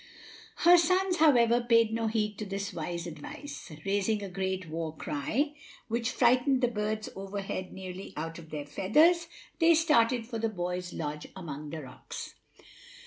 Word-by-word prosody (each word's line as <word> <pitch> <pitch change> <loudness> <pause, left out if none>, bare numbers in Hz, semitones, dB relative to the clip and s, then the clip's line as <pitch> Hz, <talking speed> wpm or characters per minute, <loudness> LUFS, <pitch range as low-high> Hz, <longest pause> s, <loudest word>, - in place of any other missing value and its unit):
Her 350 0 +9
sons, 365 +2 +2
however, 245 -7 +5
paid 230 -2 +4
no 225 0 0
heed 210 -1 -1
to 215 - -3
this 195 +1 -4
wise 170 +1 -4
advice. 170 - -8
Raising 205 +2 +1
a 195 - -5
great 190 -1 -2
war 160 0 -4
cry, 255 - -1 0.4
which 230 +1 0
frightened 255 +1 +3
the 245 - +3
birds 215 -1 -2
overhead 195 -1 -5
nearly 190 0 -7
out 165 +2 -4
of 160 -1 -12
their 150 -2 -5
feathers, 310 - +3 0.3
they 335 -1 +6
started 250 -7 +3
for 230 -1 -5
the 225 0 0
boy's 180 -2 -3
lodge 150 -1 -4
among 150 -5 -6
the 155 0 -6
rocks. 130 - -8
210 Hz, 155 wpm, -30 LUFS, 175-245 Hz, 0.4 s, Her